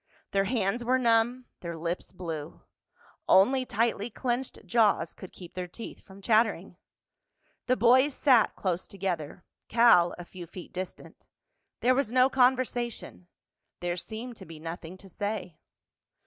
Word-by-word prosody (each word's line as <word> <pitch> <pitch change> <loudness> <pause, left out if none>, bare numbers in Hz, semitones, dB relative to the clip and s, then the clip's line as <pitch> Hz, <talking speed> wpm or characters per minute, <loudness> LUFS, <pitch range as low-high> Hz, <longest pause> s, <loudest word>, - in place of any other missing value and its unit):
Their 195 0 +2
hands 225 +1 0
were 255 +2 +3
numb, 240 +1 +2
their 170 -2 -6
lips 170 +2 -4
blue. 165 -4 -6 0.7
Only 255 +7 +5
tightly 225 0 0
clenched 245 +2 -3
jaws 225 -4 +2
could 185 - -11
keep 175 -2 -12
their 180 -1 -4
teeth 225 +6 -9
from 195 0 -15
chattering. 215 -5 +2 0.9
The 255 - +3
boys 255 +5 +5
sat 255 -6 +4
close 185 -2 -2
together; 180 -5 -4 0.2
Cal 230 -7 +5
a 175 - -8
few 175 -1 -10
feet 175 +1 -11
distant. 185 0 -8 0.5
There 255 - +4
was 265 -3 0
no 255 +1 +4
conversation—there 240 -8 -2
seemed 230 +5 -6
to 190 - -11
be 160 -1 -10
nothing 165 +2 -7
to 195 - -15
say. 205 -2 -4
205 Hz, 135 wpm, -28 LUFS, 180-240 Hz, 0.9 s, Only